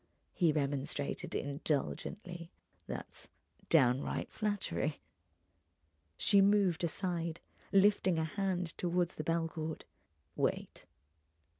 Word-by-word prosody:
he 170 -4 +3
remonstrated, 140 -1 -2
indulgently—"that's 170 +5 -4 0.4
downright 130 -4 +3
flattery." 205 -8 -1 1.2
She 200 0 +5
moved 195 -4 +4
aside, 170 -1 -1 0.3
lifting 195 -3 +4
a 160 - +1
hand 180 -1 -2
toward 175 0 +1
the 155 - -5
bell 165 +1 +1
cord. 160 -1 -5 0.5
"Wait!" - - -2
170 Hz, 85 wpm, -34 LUFS, 155-190 Hz, 1.2 s, She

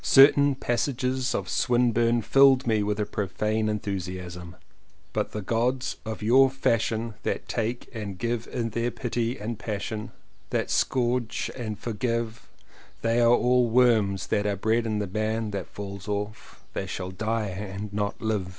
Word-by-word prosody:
Certain 140 +1 +7
passages 130 0 -1
of - - -2
Swinburne 120 -1 +2
filled 135 +2 +5
me 110 -3 +2
with 105 +1 -1
a 105 - +1
profane 110 +1 -1
en 105 - 0
thusiasm: 90 -3 -5 0.6
"But - - -1
the 105 - -4
Gods 120 +5 0
of 110 -1 -4
your 130 +5 +6
fashion 115 -3 0
That - - -2
take 115 +2 -2
and 105 -4 -4
that - - -16
give 115 +2 -2
In 115 -2 -3
their 115 +2 0
pity 120 0 -2
and 110 +2 -5
passion 105 0 -4 0.4
That - - -1
scourge 125 -2 0
and 110 -4 -4
forgive 115 0 -3 0.5
They 115 +1 +2
are 120 +1 +6
worms 120 -5 +3
that 105 0 +2
are 100 - 0
bred 110 +4 +1
in 110 -1 -1
the 105 - -1
bank 110 +2 -1
that 100 -3 -4
falls 100 -1 -8
off; 105 +1 -5
They 95 - -3
shall 95 0 -4
die 110 +2 -1
and 100 +2 -6
not 100 -1 -2
live." 105 -5 -1
110 Hz, 160 wpm, -26 LUFS, 105-120 Hz, 0.6 s, Certain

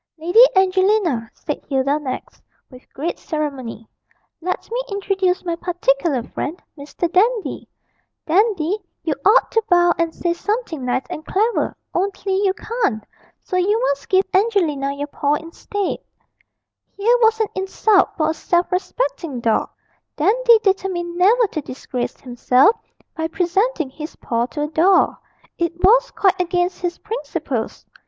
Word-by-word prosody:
'Lady 350 +9 +6
Angelina,' 375 - +2
said 295 - -5
Hilda 275 +2 +1
next, 260 -4 -6 0.3
with 255 0 -16
great 320 +5 -4
ceremony, 270 -8 -4 0.5
'let 365 +2 -3
me - - -1
introduce 390 -2 0
my 340 -1 -1
particular 320 -6 0
friend 315 +8 -5 0.2
Mr. 290 +4 -3
Dandy. 435 +4 +1 0.6
Dandy, 385 +1 +2 0.2
you 315 - 0
ought 425 +5 +4
to 450 - +2
bow 350 -1 +5
and 335 -1 +1
say 345 -1 0
something 415 - -3
nice 250 +1 0
and 310 - -5
clever, 435 +8 0 0.2
only 390 +1 -1
you 390 - +3
can't; 425 - -2 0.4
so 365 - -2
you 405 +5 +2
must 280 - -1
give 380 0 +4
Angelina 360 -10 +1
your 285 +1 -4
paw 290 0 0
instead.' 335 +5 -4 1.0
Here 460 +5 +3
was 445 0 +4
an 435 -3 +1
insult 385 +1 +2
for 310 -1 +2
a - - -2
self 345 +2 0
respecting 365 - -2
dog! 230 -2 +1 0.5
Dandy 465 +8 +4
determined 370 -3 -1
never 430 +7 +4
to 310 - -3
disgrace 255 -2 -5
himself 255 - +3 0.4
by 320 0 -2
presenting 355 - 0
his 305 +4 -8
paw 235 0 -1
to 295 +3 -4
a - - -1
doll; 350 +5 +3 0.4
it 340 0 0
was 485 +6 +5
quite 380 -1 +1
against 360 +1 -1
his 350 -1 -2
principles. 300 - -4
350 Hz, 140 wpm, -20 LUFS, 295-400 Hz, 1.0 s, Lady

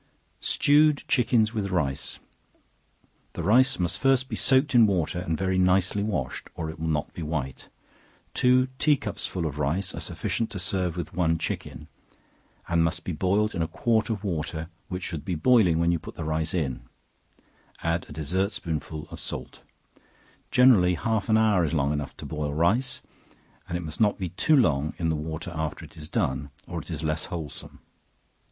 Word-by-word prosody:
Stewed 150 0 +3
Chickens 115 -4 +3
With 105 -3 -2
Rice. 75 -7 -1 1.2
The 85 - -4
rice 130 +8 +4
must 90 -2 0
first 135 -1 +3
be 110 - -3
soaked 135 +5 +3
in 115 -3 +7
water, 90 -3 0
and 80 -3 -2
very 95 -1 0
nicely 95 +2 +3
washed, 90 -12 -3
or 80 -2 -3
it 80 - -13
will 80 - -2
not 75 -2 -1
be - - -7
white; 75 -4 -4 0.6
two 130 +1 +4
tea 150 -1 +4
cupsful 100 -6 -3
of 75 -1 -4
rice 85 +7 -1
are - - -5
sufficient 115 -1 -2
to - - -6
serve 90 -2 -1
with 85 -1 -5
one 85 -2 +2
chicken, - - -5 0.8
and 85 -1 +2
must 80 +2 0
be - - -3
boiled 100 +6 +1
in 85 - -2
a 80 - 0
quart 115 +5 +1
of 110 -3 -2
water, 80 -3 -3 0.2
which 90 0 -5
should 80 -6 -4
be 90 - -2
boiling 95 -2 +4
when 85 +1 +2
you 85 - +1
put - - -10
the 80 - -5
rice 80 +2 -1
in; 70 -8 -1 1.0
add 85 0 0
a - - -10
dessert 90 +7 -1
spoonful 80 -2 -4
of - - -8
salt; - - -7 0.9
generally 110 -9 +5
half 110 +2 -1
an 110 - +5
hour 105 -5 +4
is 80 0 0
long 70 -1 +1
enough 75 -2 -4
to - - -8
boil 75 -1 -3
rice, 110 - +1 0.7
and 85 - -1
it - - -5
must 80 +2 -6
not 105 -2 +3
be 90 -2 -3
too 150 - +3
long 75 - +2
in 80 -2 0
the 80 - +1
water 80 +3 -5
after 80 0 -4
it 75 - -16
is 75 -1 -9
done, 70 +2 -1 0.2
or - - -5
it - - -15
is - - -4
less 80 0 -1
wholesome. 80 -4 -7
85 Hz, 185 wpm, -26 LUFS, 80-105 Hz, 1.2 s, in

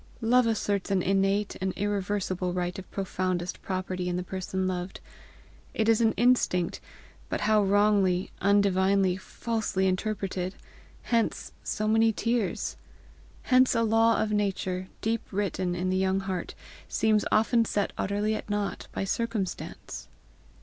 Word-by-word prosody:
Love 240 +1 +4
asserts 205 -3 0
an 190 -2 +1
innate 195 +2 +1
and 190 -1 -1
irreversible 195 -3 -1
right 180 0 -2
of 190 - -11
profoundest 185 -2 -2
property 185 -1 -3
in 175 - -1
the 180 - -2
person 190 0 -3
loved. 180 0 -4 0.8
It 220 - +1
is 225 0 +4
an 225 -1 +4
instinct 235 -8 +2 0.5
but - - -2
how 215 0 +4
wrongly, 195 -2 +3
undivinely, 195 -1 +3
falsely 220 -1 -2
interpreted! 190 -1 -1 0.5
Hence 230 -2 0
so 215 0 -2
many 225 +1 +4
tears! 230 -2 -1 0.7
Hence 255 -1 +4
a 230 - +3
law 225 +1 +4
of 215 - 0
nature, 190 -3 -1
deep 225 0 0
written 185 -2 -1
in 185 +1 -1
the 185 - +1
young 190 0 +1
heart, 190 -2 -4 0.3
seems 215 -2 +2
often 230 +2 +4
set 205 -2 -1
utterly 205 +2 0
at 215 - -5
nought 205 -1 -2
by - - -2
circumstance! 215 -1 -3
200 Hz, 135 wpm, -28 LUFS, 185-220 Hz, 0.8 s, Love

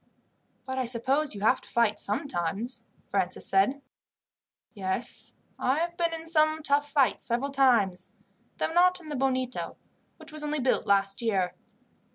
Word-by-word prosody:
"But 260 0 -3
I 255 - 0
suppose 260 +3 0
you 200 - -7
have 235 +5 +3
to - - -16
fight 230 -3 +2
sometimes?" 215 - -1 0.3
Francis 185 -2 -1
asked. 195 +8 +4 1.0
"Yes, 190 +1 -2 0.3
I 260 +3 +1
have 340 +1 -1
been 340 -1 0
in 325 0 -6
some 310 -1 +3
tough 290 0 +2
fights 280 -4 +2
several 255 +4 0
times, 240 -9 +2 0.5
though - - -1
not 365 +1 +4
in 320 -3 -12
the 295 - -3
Bonito, 260 -1 -1 0.4
which - - -12
was 305 0 -4
only 300 0 -1
built 255 -3 +1
last 195 0 +3
year. 195 -6 0
260 Hz, 155 wpm, -28 LUFS, 210-300 Hz, 1.0 s, asked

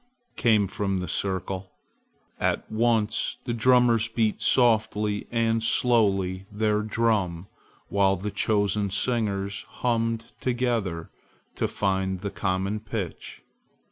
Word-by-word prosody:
came 110 -4 +3
from 95 0 -2
the 90 -1 -3
circle. 95 +1 -3 0.7
At - - -1
once 110 -1 +1
the 120 - -2
drummers 120 -1 +4
beat 115 -2 0
softly 110 -4 +2
and 115 -1 +1
slowly 100 -6 +2
their 105 0 +1
drum 105 -6 0 0.4
while 95 0 +2
the 100 +3 -4
chosen 100 -1 +1
singers 100 -2 -1
hummed 115 -1 -1
together 120 -9 -1 0.4
to - - 0
find 95 -2 -1
the 100 -1 -4
common 95 +2 -1
pitch. 105 -4 -6
105 Hz, 110 wpm, -26 LUFS, 95-115 Hz, 0.7 s, drummers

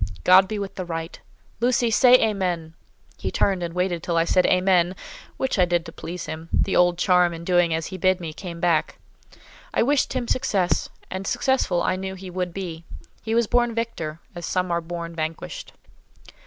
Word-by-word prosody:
God 185 +1 +7
be 215 - -3
with 200 -1 -4
the 185 - -5
right. 165 -1 -5 0.4
Lucy, 240 0 +2
say 250 +3 +7
Amen!" 185 -8 0 0.5
He - - -2
turned, 195 -3 +1
and 170 0 -4
waited 180 -2 0
till 170 0 -1
I 165 - +3
said 185 +1 +3
"Amen!"—which 185 +6 0
I 180 - +6
did 175 -1 0
to - - -8
please 170 +2 -7
him: 160 +1 -7
the 195 - +1
old 175 -1 +4
charm, 180 -1 +3
in 165 - -8
doing 175 -1 +3
as 160 0 -1
he 185 - -6
bid 185 +1 +2
me, 165 -3 -6
came 170 0 -8
back. 170 -3 +1 0.8
I - - +4
wished 280 +2 +1
him 250 -2 -2
success; 195 -8 0 0.2
and 190 +1 -4
successful 245 -8 +1
I 185 - 0
knew 190 0 -5
he 185 -1 -9
would 180 0 -2
be. 170 -3 -6 0.4
He 225 0 -2
was 235 0 +3
born 240 +1 +1
victor, 165 -9 -3
as 175 -1 -6
some 185 -1 -1
are 170 0 +1
born 170 0 -6
vanquished. 165 - -5
180 Hz, 190 wpm, -24 LUFS, 170-195 Hz, 0.8 s, God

